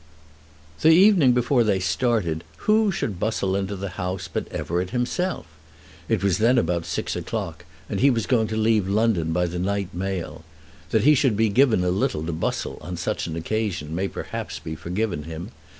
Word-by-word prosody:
The 160 - +6
evening 170 -6 +6
before 125 0 +3
they 100 -3 +1
started 95 -4 0 0.2
who 215 -1 +4
should 105 - -3
bustle 100 -3 0
into 100 0 -2
the 95 0 -6
house 90 +1 -3
but 90 - -4
Everett 90 +2 -2
himself. 125 - -1 0.6
It 110 -4 +1
was 100 -1 +2
then 120 +4 +4
about 85 -4 0
six - - -2
o'clock, - - -4 0.2
and - - -3
he 140 - +5
was 115 -5 0
going 115 -4 +2
to 110 - -3
leave 110 -3 +2
London 100 -6 +1
by 90 +2 +1
the 90 +1 -4
night 100 0 -2
mail. 90 -3 -4 0.5
That 110 - +2
he 150 +4 +7
should 130 -6 +2
be 110 - +3
a - - +1 0.2
little 90 -7 0
given - - -4
to 85 - -3
bustle 80 - -3
on 90 0 -6
such 95 +3 -2
an 80 - -4
occasion 85 -3 -2
may 95 +4 -1
perhaps - - -5
be 80 - -6
forgiven 85 +1 -3
him. 80 +6 -7
100 Hz, 185 wpm, -24 LUFS, 90-115 Hz, 0.6 s, he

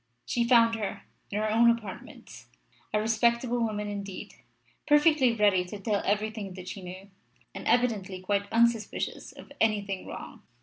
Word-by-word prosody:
She 240 - 0
found 235 -1 +5
her, 215 -3 -4 0.3
in 205 - -3
her 215 0 0
own 235 +2 +5
apartments, 230 -5 -5 0.4
a 210 - +1
respectable 235 +2 +1
woman 210 -2 -1
indeed, 200 -2 -6 0.5
perfectly 295 -3 +5
ready 205 -4 +3
to 200 +3 -8
tell 205 0 0
everything 210 -1 -1
that 185 -1 -8
she 195 - -7
knew, 185 +2 -10 0.4
and - - -7
evidently 210 -7 +1
quite 200 +2 -1
unsuspicious 230 -1 0
of - - -14
anything 200 -3 0
wrong. - - -9
215 Hz, 145 wpm, -28 LUFS, 200-235 Hz, 0.5 s, found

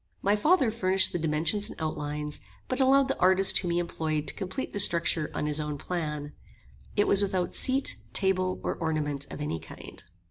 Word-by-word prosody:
My 200 +2 +3
father 270 - +3
furnished 190 -4 +2
the 175 - -1
dimensions 165 +7 -1
and - - -10
outlines, 150 -1 -4 0.3
but 255 - -2
allowed 270 +1 +4
the 270 - -2
artist 190 +1 +4
whom 180 - -3
he 170 - 0
employed 160 -3 -2
to - - +2
complete 195 +7 -5
the 205 - -3
structure 170 -4 +2
on - - -1
his 150 0 0
own 150 -1 -3
plan. 150 -3 -4 0.6
It 205 - +2
was 200 - +5
without 190 -3 -1
seat, 265 +1 +1
table, 185 -1 +2
or - - -1
ornament 150 -4 -2
of - - -8
any 150 - -3
kind. - - -11
175 Hz, 185 wpm, -28 LUFS, 150-200 Hz, 0.6 s, was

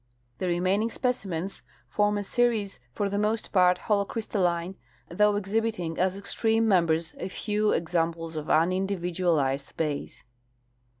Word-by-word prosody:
The 185 - -1
remaining 185 +5 +1
specimens 195 -8 -3 0.3
form 210 0 +1
a 205 - -2
series 220 - 0
for 200 +10 -1
the 200 +1 -1
most 215 +2 -1
part 180 -2 +4
holo 205 +1 +1
crystalline, 185 -5 -1 0.3
though 210 +4 +3
exhibiting 205 -4 -1
as 185 +1 +1
extreme 225 +3 +1
members 165 -4 +2
a 185 - -4
few 210 +2 0
ex 165 +1 -2
amples 165 -1 -1
of 155 -1 -4
unindividualized 170 -5 +1
base. 150 -3 -3
190 Hz, 130 wpm, -27 LUFS, 170-210 Hz, 0.3 s, part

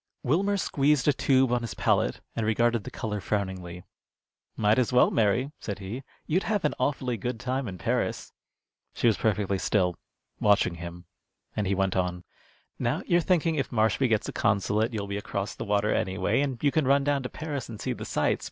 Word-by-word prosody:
Wilmer 195 +9 +2
squeezed 145 -6 +2
a 145 - +5
tube 130 -1 +3
on 125 -1 +2
his 115 -6 -5
palette - - +1
and 115 - -1
regarded 115 0 +1
the - - -5
color 105 -2 -4
frowningly. 95 -3 -3 0.7
"Might 105 +2 +3
as 125 - +1
well, 125 0 +5
Mary," 115 +6 +2
said 100 - -4
he. 100 +6 -6 0.2
"You'd 175 +5 +1
have 205 -6 +1
an 150 - +2
awfully 125 -2 0
good 120 +2 -3
time 130 +1 -2
in 95 -2 -6
Paris." 85 - -2 0.6
She - - -2
was 115 -3 +5
perfectly 100 -3 0
still, 90 -4 +1 0.4
watching 100 -4 +3
him, 85 0 -8 0.5
and 105 -2 -1
he 100 - +1
went 95 0 0
on: 90 -1 -1 0.6
"Now - - 0
you're 175 0 +3
thinking 165 -2 +2
if 140 - -1
Marshby 110 +3 +2
gets 110 -1 +1
the - - -5
consulate 105 +3 +1
you'll 105 -3 -3
be 100 0 -3
across 100 0 -3
the - - -6
water 105 0 +1
anyway, 100 +4 +1
and 135 -3 -1
you 145 - +4
could 155 -3 +1
run 140 +1 +4
down 145 -1 +1
to 125 - -5
Paris 145 -5 -5
and 110 -3 -8
see - - -2
the - - -7
sights. - - 0
110 Hz, 200 wpm, -27 LUFS, 100-135 Hz, 0.7 s, a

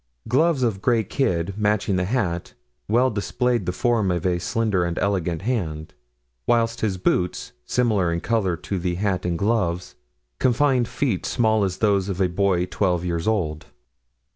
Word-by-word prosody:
Gloves 140 +3 +2
of 105 -5 0
gray 115 0 +2
kid, 95 - -1
matching 105 -2 +1
the 90 0 0
hat, 95 -6 -2 0.3
well 125 +4 +3
displayed 120 0 -1
the - - +1
form 115 -1 +1
of 90 -1 -1
a 90 -1 +1
slender 100 +1 0
and 85 -1 -2
elegant 90 -4 -1
hand; 80 -10 -2 0.5
whilst 115 -1 +1
his 100 -4 0
boots, 90 -1 -1 0.2
similar 105 -8 +1
in 85 - -1
color 95 -5 0
to 95 +3 -4
the 90 0 -1
hat 95 -1 -1
and 85 -1 -1
gloves, 90 -4 0 0.5
confined 130 -1 +2
feet 120 -11 -1
small 110 -3 +2
as 95 -2 -1
those 100 -3 +1
of 95 -1 -3
a 95 - +3
boy 90 -1 +1
twelve 90 -2 0
years 85 0 -2
old. 80 -9 -1
100 Hz, 165 wpm, -23 LUFS, 90-115 Hz, 0.5 s, well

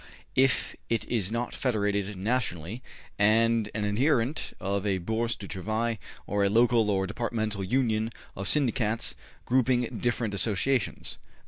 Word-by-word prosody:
if 130 -1 +2
it 115 - 0
is 110 -5 0
not 120 +1 -2
federated 105 -5 0
nationally 105 -1 -2 0.4
and 110 +1 +4
an 110 - -1
adherent 125 +5 +1
of 100 0 -1
a 100 -2 +1
Bourse 110 +5 -1
du 100 - -9
Travail 110 +4 -2 0.3
or 100 0 +1
a 100 - +4
local 115 0 +4
or 95 -1 +2
departmental 110 -1 -2
Union 110 0 +1 0.3
of 95 +1 -4
Syndicats 115 -6 +1 0.3
grouping 125 -1 +2
different 120 -3 0
associations.' 110 +3 0
110 Hz, 130 wpm, -28 LUFS, 100-120 Hz, 0.4 s, and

